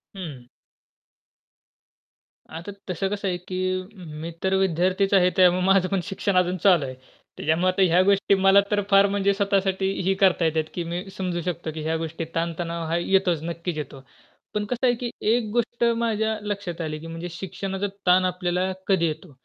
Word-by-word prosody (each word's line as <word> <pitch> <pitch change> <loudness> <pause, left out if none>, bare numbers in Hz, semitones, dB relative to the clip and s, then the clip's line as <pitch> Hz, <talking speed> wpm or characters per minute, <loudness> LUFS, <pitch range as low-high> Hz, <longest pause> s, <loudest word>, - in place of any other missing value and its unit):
हं. 150 -10 -8 2.0
आता 170 +5 -7 0.2
तसं 190 +2 -1
कसं 200 0 -3
आहे, 180 -1 -1
की 185 +1 -2 0.4
मी 165 +1 -5
तर 190 - +1
विद्यार्थीच 190 +2 +1
आहे 180 -2 +5
त्यामुळे 180 0 +5
माझं 190 -1 +4
पण 195 - +1
शिक्षण 195 +1 -2
अजून 180 0 +2
चालू 180 -7 +5
आहे. 130 -1 -6 0.4
त्याच्यामुळे 160 +4 +1
आता 195 - 0
ह्या 180 -1 +5
गोष्टी 200 0 +3
मला 195 +1 +5
तर 205 0 +2
फार 195 0 +6
म्हणजे 200 0 +1
स्वतःसाठी 195 -1 +1
ही 190 +2 +2
करता 185 -3 +4
येतात, 160 0 +1
की 175 - -3
मी 170 +2 -4
समजू 180 -2 -2
शकतो, 170 -2 -4
की 155 - -4
ह्या 160 +1 0
गोष्टी 165 0 -4
ताणतणाव 170 0 -2
हा 165 +1 0
येतोच, 180 -2 +1
नक्कीच 170 0 -4
येतो. 140 -2 -6 0.5
पण 210 0 -1
कसं 245 +4 -2
आहे, 245 - +4
की 240 0 -4 0.2
एक 235 +1 +3
गोष्ट 240 +1 -1
माझ्या 220 -1 0
लक्षात 200 -5 -4
आली, 155 -1 -4
की 165 - -9
म्हणजे 165 +2 -6
शिक्षणाचा 195 +2 -4 0.2
ताण 185 +1 +5
आपल्याला 180 0 -1 0.2
कधी 190 -4 +3
येतो? 155 +1 -6
185 Hz, 175 wpm, -24 LUFS, 170-195 Hz, 2.0 s, फार